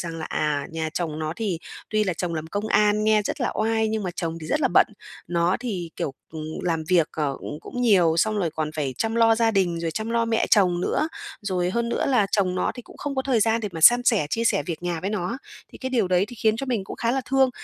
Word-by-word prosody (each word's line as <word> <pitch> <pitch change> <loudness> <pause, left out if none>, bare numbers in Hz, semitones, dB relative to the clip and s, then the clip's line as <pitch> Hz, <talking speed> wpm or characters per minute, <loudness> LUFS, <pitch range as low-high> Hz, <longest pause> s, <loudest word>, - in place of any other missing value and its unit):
rằng 165 -1 -5
là, 160 - -4
à, 145 -2 -1
nhà 160 -1 -3
chồng 160 -3 -2
nó 155 0 -2
thì 200 -7 -2 0.3
tuy 215 -1 +2
là 185 - 0
chồng 170 0 -3
làm 160 0 -4
công 205 +5 -3
an 210 0 +3
nha 215 -1 +4
rất - - -3
là - - +1
oai 220 0 +1
nhưng 220 -1 -1
mà 180 - -2
chồng 165 -1 -3
thì 155 - -7
rất 300 - 0
là - - +3
bận. - - +7 0.4
Nó 175 +1 +2
thì, 185 -9 -4
kiểu, 135 - -3 0.2
ừm, 155 -1 -6 0.2
làm 165 -3 -1
việc, 170 -4 +3
ờ, 145 -3 -1
cũng 150 - -6
cũng 245 - -5
nhiều 180 -8 +4
xong 215 +4 +2
rồi 175 -5 0
còn 155 0 -3
phải 140 -4 -2
chăm 225 0 0
lo 225 -1 +5
gia 225 0 +2
đình, 180 -5 +1
rồi 165 -1 -1
chăm 220 +7 -4
lo 230 0 +2
mẹ 230 0 +1
chồng 180 -5 +4
nữa. 310 - 0 0.3
Rồi 180 -3 -1
hơn 235 +2 -1
nữa - - -1
là 245 -7 +3
chồng 185 -3 +2
nó 180 - 0
thì 245 - -8
cũng - - -16
không 290 -1 -4
có 265 - 0
thời 255 -5 +1
gian 225 +1 +2
để 210 - -3
mà 165 - -6
san 240 +8 +8
sẻ, 215 - +3
chia 230 - 0
sẻ 205 -4 +2
việc 170 -1 -4
nhà 175 -2 -2
với 195 - -2
nó. 210 +2 -2 0.4
Thì - - -11
cái 260 0 -4
điều 225 -8 +1
đấy 180 +1 +3
thì 245 - -10
khiến 220 0 +2
cho 275 - -4
mình 230 -7 -1
cũng - - -8
khá 230 - 0
là 270 - +1
thương. 270 -1 +4
200 Hz, 280 wpm, -24 LUFS, 165-225 Hz, 0.4 s, san